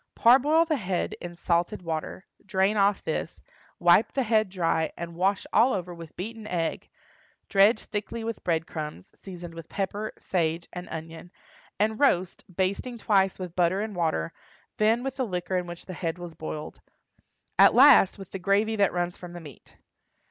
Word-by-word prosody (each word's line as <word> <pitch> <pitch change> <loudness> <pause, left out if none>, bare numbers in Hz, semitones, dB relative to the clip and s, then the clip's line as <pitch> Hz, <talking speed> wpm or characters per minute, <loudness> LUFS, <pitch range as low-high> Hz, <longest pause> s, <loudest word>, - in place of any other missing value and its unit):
Parboil 285 +7 +5
the 315 -2 0
head 185 -5 -2
in 175 0 -7
salted 175 +3 0
water, 165 +3 -4 0.2
drain 195 0 +1
off 200 -1 +2
this, - - -3 0.4
wipe - - +4
the 270 - +1
head 215 -3 +2
dry, 165 -4 0
and 170 0 -6
wash 190 +3 +1
all 250 +3 +5
over 180 -2 -3
with 165 -2 -11
beaten 220 +3 -6
egg; 170 -4 -2 0.6
dredge 205 +2 +4
thickly 215 +2 -5
with 230 -1 -5
bread 165 -2 0
crumbs, 150 - -7
seasoned 175 -3 -10
with 165 -1 -10
pepper, 205 +2 -3
sage, 165 -2 -1
and 180 0 -7
onion, 165 +2 -8 0.5
and 215 +1 +1
roast, 185 -11 +2
basting 200 +7 -1
twice 195 -4 +2
with 180 -2 -7
butter 180 +1 +2
and 215 -1 -4
water; 160 - -1 0.4
then 225 +3 +2
with 270 0 -4
the 260 - 0
liquor 180 -4 -3
in 180 -1 -1
which 175 0 -9
the 185 - -7
head 165 -1 -3
was 175 -2 -8
boiled; 155 -1 -7 0.8
at - - +7
last 260 -8 +7
with 195 -2 -11
the 195 - -5
gravy 205 +4 +2
that 200 -2 +3
runs 175 0 -2
from 175 -1 -9
the 175 - -7
meat. 150 -7 -14
185 Hz, 175 wpm, -27 LUFS, 170-215 Hz, 0.8 s, at